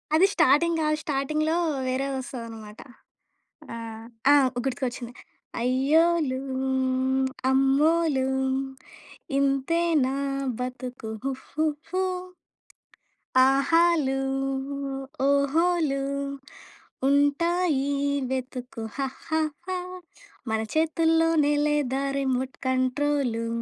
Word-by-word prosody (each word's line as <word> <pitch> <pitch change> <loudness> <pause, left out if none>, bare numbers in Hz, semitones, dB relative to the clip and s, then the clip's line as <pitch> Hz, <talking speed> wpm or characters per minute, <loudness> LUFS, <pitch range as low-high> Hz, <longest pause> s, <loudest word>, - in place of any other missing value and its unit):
అది 365 +5 +6
స్టార్టింగ్ 325 +5 +4
కాదు. 305 0 +1
స్టార్టింగ్‌లో 305 +3 0 0.3
వేరే 260 +2 0
వస్తదన్నమాట. 225 -5 -8 1.0
ఆహ్, 225 -1 -7 0.3
ఆ! - - +8 0.3
గుర్తుకొచ్చింది. 245 -2 -3 0.5
అయ్యోలు 280 +3 +2 1.1
అమ్మోలు 275 +1 +3 1.1
ఇంతే 275 +4 +1 0.2
నా 265 +1 -1 0.4
బతుకు 250 -2 -5
హుహుహు. 310 +6 -2 1.4
ఆహాలు 280 0 +3 1.1
ఓహోలు 280 +1 +2 1.1
ఉంటాయి. 285 0 +2 0.4
వెతుకు 255 -2 -5
హాహాహా. 315 +6 -3 0.7
మన 220 0 0
చేతుల్లో‌నే 325 -1 +3
లేదా 285 -3 0 0.2
రిమోట్ 260 -1 -1
కంట్రోలు. 255 -2 0
275 Hz, 65 wpm, -26 LUFS, 260-315 Hz, 1.4 s, ఆ